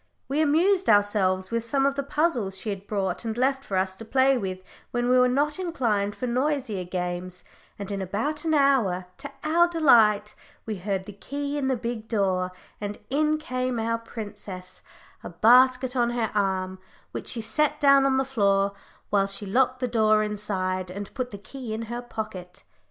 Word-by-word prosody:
We 285 +3 0
amused 355 +6 +3
ourselves 200 -3 +3
with 230 0 0
some 270 +4 +1
of 275 - +2
the 280 - -2
puzzles 275 - 0
she 210 +2 -3
had 200 0 -7
brought 200 0 -2
and 225 0 -3
left 270 +2 +1
for 195 - -2
us 190 0 0
to 225 - -7
play 265 +4 +3
with 190 -6 -3 0.3
when 240 0 -1
we 255 0 +5
were 250 - +5
not 290 +6 0
inclined 225 - -1
for 255 - -4
noisier 250 -5 -1
games, 180 0 -4 0.3
and 200 0 -6
in 200 -1 -3
about 220 - -2
an 320 -1 +1
hour, 245 -11 +2
to 280 - -7
our 335 +3 +4
delight, 225 -11 +4 0.3
we 215 -2 -4
heard 190 0 -2
the 205 - -9
key 280 +7 -5
turn 290 -2 -1
in - - +1
the 260 -2 +1
big 230 -1 -5
door, 190 -4 0 0.3
and 205 0 -4
in 305 +2 +2
came 255 -4 -2
our 230 +1 -1
princess, 205 -5 -9 0.4
a - - -6
basket 250 +6 +4
on 240 -1 +2
her 240 -2 -1
arm, 190 -2 -1 0.3
which - - -6
she 235 - -1
set 300 +6 0
down 275 -2 +6
on 270 -1 +2
the 265 - +1
floor, 200 -6 +2 0.4
while 195 -1 +3
she 200 +1 -4
locked 255 +5 +1
the 250 - +1
door 215 -2 +3
inside, 190 -3 -2
and 200 +2 -7
put 255 -2 -3
the 200 - -8
key 220 +3 -7
in 225 - -4
her 240 - -3
pocket. 195 -6 -7
225 Hz, 190 wpm, -26 LUFS, 200-270 Hz, 0.4 s, down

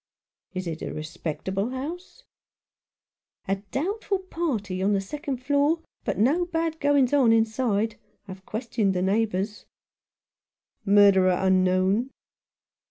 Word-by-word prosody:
"Is 185 0 -3
it 165 -2 -5
a - - -4
respectable 170 +6 -4
house? 330 - -7 0.4
" - - -69
" - - -46
A 195 +1 +1
doubtful 395 - -1
party 270 - -3
on 200 +2 +2
the 200 - +2
second 275 +6 -4
floor, 290 +4 +2 0.2
but 200 -5 -1
no 285 - +3
bad 325 -1 -2
goings 285 -3 +3
on 265 -5 +5
inside. 225 -1 +1 0.3
I've 190 0 -9
questioned 215 -2 -1
the 180 - 0
neighbours." 205 0 -1 0.6
" - - -53
Murderer 195 -3 +5
unknown 190 +5 +2
220 Hz, 125 wpm, -25 LUFS, 190-285 Hz, 0.6 s, on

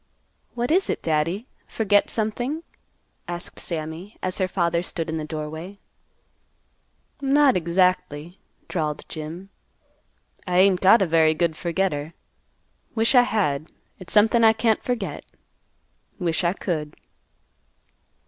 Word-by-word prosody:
"What 245 +3 -1
is 375 +4 +2
it, - - -2
Daddy? 165 +7 0 0.2
Forget 205 -2 +2
something?" 240 +8 -2 0.6
asked 175 0 -5
Sammy, 165 +4 -6
as 185 +1 -2
her 185 - +2
father 170 -2 0
stood 165 -2 -4
in 160 - -2
the - - -4
doorway. 160 +5 -6 1.4
"Not 275 0 +4
exactly," 175 -2 0 0.3
drawled 155 -4 -3
Jim. 165 +5 -7 1.0
"I 180 0 +1
ain't 185 -1 +5
got 195 +3 +6
a - - +2
very 160 -2 +3
good 165 0 0
forgetter. 170 -3 -2 0.8
Wish 225 +2 +2
I 250 - +8
had. 165 -11 -1 0.3
It's 185 - -10
somethin' 220 +2 +5
I 220 0 +7
can't 220 0 +1
forget. 245 -2 -3 0.9
Wish 170 -2 -1
I 170 +1 +2
could." 155 -6 -3
180 Hz, 120 wpm, -24 LUFS, 160-215 Hz, 1.4 s, I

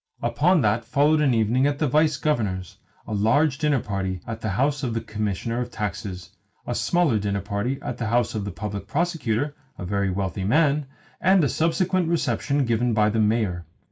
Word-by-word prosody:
Upon 175 +2 +3
that 110 +1 +1
followed 145 +6 +2
an 135 -5 +3
evening 115 +5 +2
at 145 -1 -1
the 150 - +1
Vice 150 +1 +2
Governor's, 105 - -2 0.3
a - - -5
large 135 +8 +2
dinner 150 -4 +2
party 95 -3 -3
at 115 0 -6
the 110 - -2
house 135 +8 0
of 120 -5 -2
the 115 - -1
Commissioner 110 +2 -3
of 120 - -4
Taxes, 95 -5 -5 0.3
a - - -2
smaller 170 -11 +2
dinner 100 -1 -1
party 100 +6 -2
at 120 - -5
the 115 - -2
house 120 0 +1
of 110 -2 -2
the 100 - -4
Public 105 -1 -5
Prosecutor 145 -5 -1 0.2
(a 90 - -6
very 100 +1 0
wealthy 95 0 -2
man), 145 +5 +2 0.3
and 185 -1 +4
a - - +3
subsequent 175 +4 +1
reception 145 -4 0
given 120 0 +1
by 105 0 +3
the 110 - 0
Mayor. 105 -6 0
115 Hz, 190 wpm, -24 LUFS, 105-145 Hz, 0.3 s, and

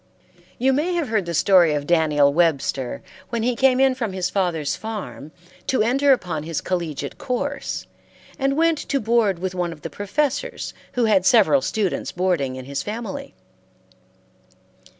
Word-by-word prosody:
You 265 +2 +2
may 330 +6 0
have 325 -7 -1
heard 210 -5 0
the 170 - -3
story 175 -4 +5
of 145 -1 -2
Daniel 150 -4 +3
Webster, 140 -6 0 0.3
when 230 -1 -2
he 245 +1 +1
came 260 0 +3
in 270 -1 +4
from 230 -6 -3
his 185 -1 -2
father's 170 -7 0
farm 210 -8 -7 0.4
to 260 - +2
enter 275 +5 +3
upon 180 - 0
his 160 0 -3
collegiate 160 -6 -4
course, 280 +3 -3 0.5
and 275 +1 +1
went 330 -1 +3
to 280 - -1
board 220 -5 +2
with 185 +1 -3
one 175 -2 -2
of 155 -2 -11
the 165 - -5
professors 290 - -2 0.2
who 245 -2 +1
had 200 -4 +3
several 235 +7 +5
students 205 -8 -1
boarding 175 -8 0
in 130 -1 -8
his 140 +1 -3
family. 240 +6 -6
200 Hz, 160 wpm, -22 LUFS, 165-260 Hz, 0.5 s, story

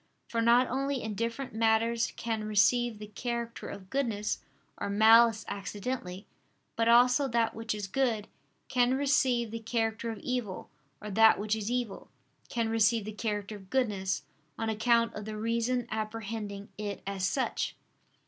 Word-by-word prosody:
For 230 - 0
not 240 +2 +5
only 270 +1 -1
indifferent 230 +4 -3
matters 225 +1 +2
can 225 -2 -2
receive 215 +3 +3
the 210 - -8
character 235 +2 -4
of 190 -1 -9
goodness 225 -7 -1 0.4
or - - -2
malice 220 +2 +6
accidentally; 200 -1 -5 0.5
but 230 0 +1
also 250 +4 +5
that 230 -2 +1
which 225 0 -3
is 205 -1 -4
good, 220 0 0 0.4
can 250 0 +2
receive 260 -4 +2
the 230 - -4
character 225 0 -1
of 225 - -4
evil, 240 -4 -4 0.3
or 210 - -5
that 220 +2 +6
which 210 +1 0
is 215 0 -3
evil, 240 -5 -3 0.4
can 230 -1 0
receive 225 -1 +2
the 215 - -4
character 210 -1 -3
of 190 -2 -16
goodness, 205 -8 0 0.3
on 225 0 -2
account 230 +1 +2
of 210 - -6
the 215 0 -5
reason 235 +2 0
apprehending 215 -2 -4
it 205 -2 -4
as 195 -1 -3
such. 265 +3 -1
225 Hz, 150 wpm, -30 LUFS, 210-240 Hz, 0.5 s, malice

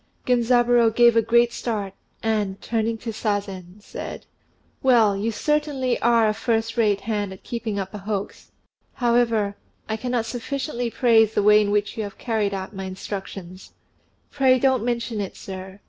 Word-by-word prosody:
Genzaburô 240 -1 +4
gave 240 -1 +6
a 230 - +5
great 235 +1 +3
start, 210 -6 -3 0.3
and, 210 -3 -1
turning 225 0 -1
to 225 +1 -5
Sazen, 200 -3 -3
said, - - -7 0.6
"Well, 230 -6 +4
you 210 +4 -1
certainly 290 -1 0
are 230 -1 +4
a 215 - +1
first 225 0 -1
rate 210 -4 +2
hand 205 -2 -2
at 190 - -11
keeping 230 -3 -4
up 195 0 -4
a 210 - -6
hoax. 200 0 -5 0.4
However, 230 -4 +1 0.3
I 220 - -2
cannot 245 0 -1
sufficiently 245 +1 -3
praise 225 -2 +3
the 205 - +2
way 210 +1 +6
in 205 - 0
which 205 +2 0
you 220 - -1
have 200 -1 -8
carried 220 -4 -1
out 190 +1 -5
my 190 0 -5
instructions." 190 -1 -7 0.6
"Pray, 260 -2 +4
don't 260 -2 +2
mention 235 -2 -2
it, 195 - -6
sir. 190 0 -8
225 Hz, 160 wpm, -23 LUFS, 205-240 Hz, 0.6 s, gave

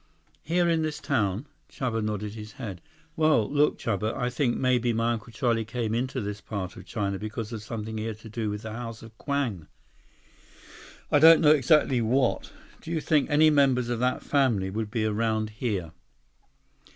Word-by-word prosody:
"Here 175 +2 +1
in 165 -1 +2
this 155 -1 -2
town?" 110 -3 0 0.2
Chuba 115 -4 -2
nodded 105 -1 -3
his 110 -1 -9
head. 110 -10 -7 0.3
"Well, 155 -9 +3
look, 145 +1 +2
Chuba. 110 0 -2
I 125 -2 -1
think 125 -1 0
maybe 125 -2 +2
my 115 +1 +1
Uncle 115 +1 -7
Charlie 115 -1 0
came 110 0 -3
into 130 +3 -1
this 105 -2 -5
part 95 -4 -5
of - - -12
China 100 -3 -2
because 110 +1 -5
of 110 - -5
something 110 0 -5
he 110 - -3
had 110 -2 -4
to 115 - -11
do 110 0 -3
with 105 +1 -5
the 110 - -6
House 115 -1 -7
of 115 -1 -13
Kwang. 135 - -2 1.4
I 145 - +5
don't 165 +2 +8
know 150 -2 +6
exactly 135 -3 +4
what. 125 +3 +1 0.3
Do - - -10
you 165 -1 0
think 150 -1 +1
any 155 +1 +5
members 135 -4 +3
of 120 -2 -1
that 125 +1 0
family 115 -10 +1
would 110 +1 -3
be 110 -1 -1
around 110 0 0
here?" 105 -7 -3
115 Hz, 185 wpm, -27 LUFS, 110-135 Hz, 1.4 s, don't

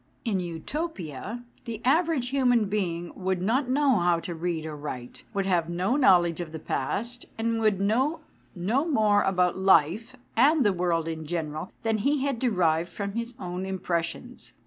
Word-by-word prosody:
In 205 -5 +1
Utopia, 185 - -5 0.2
the 230 -2 -5
average 310 -2 +2
human 250 -4 +3
being 175 -4 -2
would 190 -1 -1
not 245 +8 +1
know 270 -4 +3
how 175 -1 +2
to 170 +1 -5
read 165 -1 -3
or 155 -1 -5
write, 130 -4 -7
would 195 -2 -1
have 175 -3 +1
no 180 +8 0
knowledge 175 - +4
of 165 -3 -6
the 160 - -5
past, 230 - -3
and 225 0 0
would 215 -4 +2
know 260 +11 +1 0.3
no 210 - +1
more 215 -10 +3
about 180 -1 +1
life 190 - +3 0.2
and 290 -1 +5
the 205 - +4
world 170 -2 0
in 160 -1 -5
general, 155 0 -3
than 225 -1 +1
he 280 +5 +1
had 275 -4 -1
derived 175 -8 +2
from 200 -1 -4
his 235 +2 -4
own 180 -3 -4
impres 180 -3 -1
sions. 245 +9 -8
195 Hz, 170 wpm, -27 LUFS, 170-245 Hz, 0.3 s, and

